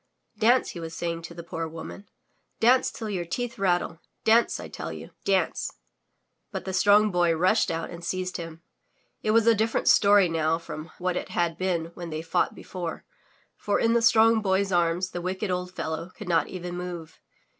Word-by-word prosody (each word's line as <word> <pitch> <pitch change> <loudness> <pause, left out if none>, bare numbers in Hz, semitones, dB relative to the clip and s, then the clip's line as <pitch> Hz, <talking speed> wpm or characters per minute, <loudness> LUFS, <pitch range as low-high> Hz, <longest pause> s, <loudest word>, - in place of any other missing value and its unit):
Dance!*' 245 +4 +4
he 175 - -8
was 165 0 -6
saying 170 -1 -3
to 170 +1 -9
the 170 - -7
poor 165 0 -4
woman. 165 +5 -9 0.5
Dance, 250 +3 +4
till 225 - -7
your 190 -4 -2
teeth 235 +7 -4
rattle! 175 -3 0 0.2
Dance, 230 +2 +4
I - - -7
tell - - -6
you. - - -9
Dance!" 195 -2 +1 0.8
But - - -5
the 190 - -4
Strong 205 +3 +5
Boy 175 -2 +2
rushed 180 +3 +3
out 165 0 -3
and 170 0 -9
seized 185 +1 -3
him. 165 -1 -8 0.6
It - - -2
was 225 0 +4
a 230 - +6
different 225 +1 0
story 200 -2 +6
now 165 -1 +1
from 160 -1 -8
what 180 0 -1
it - - -4
had 170 -2 0
been 170 -3 -1
when 170 -1 -7
they 155 0 -4
fought 165 - 0
before, 175 -3 -6 0.5
for 205 - 0
in 230 0 +3
the 235 - +3
Strong 225 0 +5
Boy*s 195 0 +1
arms 175 +1 +1
the 175 - -4
wicked 185 +2 -2
old 180 0 -2
fellow 160 +2 -4
could 210 - -9
not 170 -2 +2
even 180 -1 -6
move. 175 -3 -7
180 Hz, 190 wpm, -26 LUFS, 165-205 Hz, 0.8 s, a